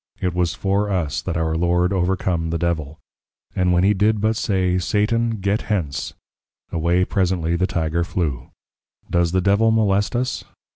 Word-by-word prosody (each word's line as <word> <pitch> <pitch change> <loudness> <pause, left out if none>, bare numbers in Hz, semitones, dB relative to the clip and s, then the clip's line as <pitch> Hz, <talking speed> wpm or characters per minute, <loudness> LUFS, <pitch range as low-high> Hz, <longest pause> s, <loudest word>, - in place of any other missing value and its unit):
It 90 -2 -1
was 90 -1 0
for 100 +1 0
Us 90 -7 -1
that 85 - -3
our 80 -1 0
Lord 90 +2 +1
overcome 90 -2 0
the 85 - -1
Devil: 80 -3 -2 0.6
and 90 -1 +2
when 90 0 +3
he 100 +2 +4
did 105 +2 +2
but 110 +2 +1
say, 95 -4 0
Satan, 115 +5 +1
Get 100 +3 0
hence, 80 - -2 0.6
away 85 +3 +1
presently 90 -4 0
the 95 +2 +1
Tygre 85 -1 -1
flew: 75 -8 -3 0.6
Does 85 -1 +2
the 95 +1 +1
Devil 100 +4 +3
molest 105 -1 +2
Us? 125 +1 -1
90 Hz, 160 wpm, -21 LUFS, 85-100 Hz, 0.6 s, he